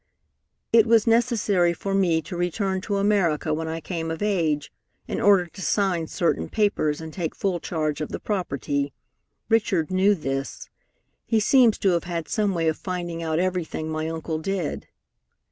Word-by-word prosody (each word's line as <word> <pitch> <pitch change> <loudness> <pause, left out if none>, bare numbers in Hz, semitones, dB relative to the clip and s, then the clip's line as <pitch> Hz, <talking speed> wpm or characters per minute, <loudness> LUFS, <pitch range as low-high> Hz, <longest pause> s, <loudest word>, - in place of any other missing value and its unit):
"It 230 -1 +6
was 225 -1 +5
necessary 225 -7 +2
for 195 +3 -4
me 175 -5 +2
to 175 - -7
return 190 +2 -1
to 205 +1 -2
America 185 -7 +1
when 160 +1 -2
I 160 +1 -3
came 165 0 -4
of 160 +5 -3
age, 160 -8 0 0.3
in - - -3
order 195 -3 +5
to 185 +3 -12
sign 185 -5 +1
certain 170 - -1
papers 205 -9 +1
and 160 -1 -8
take 170 -4 -3
full 190 -3 -1
charge 155 -3 -2
of 155 - -3
the - - -5
property. 140 - -2 0.5
Richard 205 -7 +1
knew 195 +2 +4
this. 135 -4 -4 0.6
He 225 - +3
seems 235 0 +5
to 195 - +2
have 170 -2 +1
had 170 -2 -3
some 205 -3 0
way 165 -1 0
of 160 - +1
finding 175 -3 -4
out 160 -1 -1
everything 175 -3 -2
my 155 0 -2
uncle 160 -1 -3
did. 180 -1 -3
175 Hz, 170 wpm, -24 LUFS, 160-200 Hz, 0.6 s, It